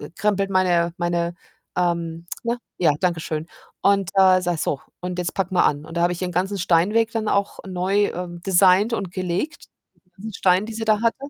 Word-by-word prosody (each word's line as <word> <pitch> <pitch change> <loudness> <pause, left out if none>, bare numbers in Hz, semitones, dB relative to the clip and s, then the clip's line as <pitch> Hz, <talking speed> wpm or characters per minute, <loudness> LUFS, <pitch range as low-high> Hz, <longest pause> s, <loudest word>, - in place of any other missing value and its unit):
krempelt 195 -1 0
meine 175 -2 +2
meine 175 0 -1 0.4
ähm, 170 -1 -1 0.2
ne, 235 +1 -1 0.2
ja, 165 -4 +4
danke 175 -3 0
schön 155 +1 -4 0.3
und, 200 -2 +2
äh, 185 -1 +6
sage: 175 -2 -1
„So 140 - -1 0.2
und 180 0 -5
jetzt 180 0 -2
packen 190 -1 -2
wir - - +5
an.“ 145 +1 0
Und 165 +1 -10
da - - +1
habe 175 0 +2
ihren 180 +1 -4
ganzen 190 +3 0
Steinweg 205 +7 +2
dann 220 -1 -1
auch 200 0 0
neu, 190 +2 +1
ähm, 175 -1 -6
designt 190 +3 +5
und 195 -5 -2
gelegt, 185 - -3 0.4
die - - -34
ganzen 210 +3 -9
Steine, 185 +2 +3
die 225 - -6
sie 225 - -3
da 215 0 +3
hatte. 230 -1 +2
185 Hz, 195 wpm, -22 LUFS, 175-200 Hz, 0.4 s, äh